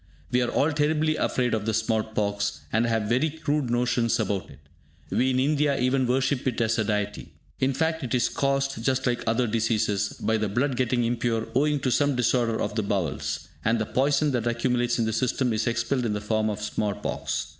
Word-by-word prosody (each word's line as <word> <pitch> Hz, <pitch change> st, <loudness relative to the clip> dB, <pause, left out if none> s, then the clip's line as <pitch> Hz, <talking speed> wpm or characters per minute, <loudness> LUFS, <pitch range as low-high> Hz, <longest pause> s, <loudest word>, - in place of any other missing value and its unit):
We 125 Hz, -, +3 dB
are 120 Hz, -, 0 dB
all 150 Hz, +3 st, +2 dB
terribly 155 Hz, +1 st, +1 dB
afraid 125 Hz, -5 st, 0 dB
of 110 Hz, -1 st, -1 dB
the 110 Hz, -, +1 dB
small 110 Hz, 0 st, +1 dB
pox, 100 Hz, -2 st, -2 dB
and 115 Hz, +2 st, +2 dB
have 115 Hz, -2 st, +1 dB
very 125 Hz, +9 st, +1 dB
crude 150 Hz, -3 st, -2 dB
notions 120 Hz, -1 st, +1 dB
about 100 Hz, -2 st, -2 dB
it. -, -, -13 dB, 0.5 s
We 130 Hz, -, +2 dB
in 130 Hz, 0 st, +1 dB
India 145 Hz, 0 st, +2 dB
even 130 Hz, +1 st, +2 dB
worship 130 Hz, +1 st, 0 dB
it 125 Hz, -, -1 dB
as 115 Hz, 0 st, +1 dB
a -, -, +3 dB
deity. 105 Hz, -1 st, -3 dB, 0.3 s
In 135 Hz, 0 st, +1 dB
fact 160 Hz, +1 st, 0 dB
it 125 Hz, -1 st, -1 dB
is 120 Hz, -, +2 dB
caused, 135 Hz, -3 st, -1 dB
just 130 Hz, +1 st, +1 dB
like 120 Hz, -1 st, 0 dB
other 115 Hz, +2 st, +2 dB
diseases, 110 Hz, -3 st, 0 dB
by 110 Hz, +1 st, +1 dB
the 110 Hz, -1 st, -1 dB
blood 130 Hz, +6 st, 0 dB
getting 125 Hz, -1 st, +1 dB
impure 115 Hz, -1 st, -1 dB
owing 150 Hz, +2 st, +2 dB
to 130 Hz, -, 0 dB
some 145 Hz, +2 st, +2 dB
disorder 120 Hz, -2 st, +1 dB
of -, -, -2 dB
the 110 Hz, -, 0 dB
bowels; 75 Hz, -7 st, -2 dB, 0.2 s
and 115 Hz, +2 st, +2 dB
the 110 Hz, -, -1 dB
poison 140 Hz, +5 st, +1 dB
that 120 Hz, -3 st, -1 dB
accumulates 120 Hz, 0 st, +1 dB
in 115 Hz, -, +1 dB
the 110 Hz, -, -1 dB
system 125 Hz, +1 st, 0 dB
is 110 Hz, +2 st, -1 dB
expelled 120 Hz, +2 st, 0 dB
in 105 Hz, -, -1 dB
the 105 Hz, -, -2 dB
form 110 Hz, +1 st, 0 dB
of 105 Hz, 0 st, -4 dB
small 105 Hz, -1 st, -1 dB
pox. -, -, -3 dB
120 Hz, 210 wpm, -26 LUFS, 110-130 Hz, 0.5 s, We